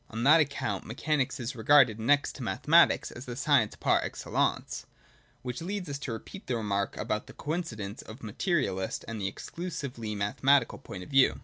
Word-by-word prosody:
On 115 +1 -4
that 155 +5 +7
account 120 -9 -2
me 115 - -6
chanics 145 -2 0
is 120 +1 -4
regarded 120 -2 +5
next 145 +6 +2
to - - -9
mathematics 145 - +4
as 120 +2 -9
the 120 - -6
science 140 -5 +2
par - - +2
excellence; - - -2 0.6
which 125 +2 -4
leads 190 +1 -4
us 140 -1 -4
to 135 -4 -4
repeat 190 - -9
the 125 - 0
remark 100 -3 -1
about 105 -1 -2
the - - -11
coincidence 120 - -4
of 110 - -10
the 130 - -11
materialist 110 - -1
with 115 -1 -5
the 95 - -1
exclusively 125 - -5
mathe 105 +5 -3
matical 135 -2 +3
point 90 - -7
of - - -12
view. 135 -1 +4
125 Hz, 190 wpm, -29 LUFS, 110-145 Hz, 0.6 s, that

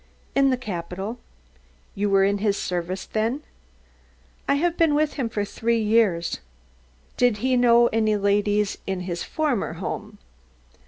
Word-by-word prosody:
"In 275 0 +4
the 255 - +1
capital." 195 +1 -5 0.7
"You 205 +1 -1
were 195 -1 +4
in 200 +1 +2
his 200 -1 +1
service 180 +1 -3
then?" 230 +7 -1 1.0
"I 280 - +3
have 335 +4 +1
been 325 -4 +3
with 300 0 +1
him 255 -5 -2
for 205 -2 -2
three 230 +3 0
years." 210 -6 +2 0.8
"Did 245 -4 +3
he 260 -1 +3
know 240 -1 +5
any 215 -1 +2
ladies 205 0 +1
in 190 -1 -2
his 175 -2 -4
former 295 -9 -1
home?" - - -6
215 Hz, 145 wpm, -24 LUFS, 195-250 Hz, 1.0 s, know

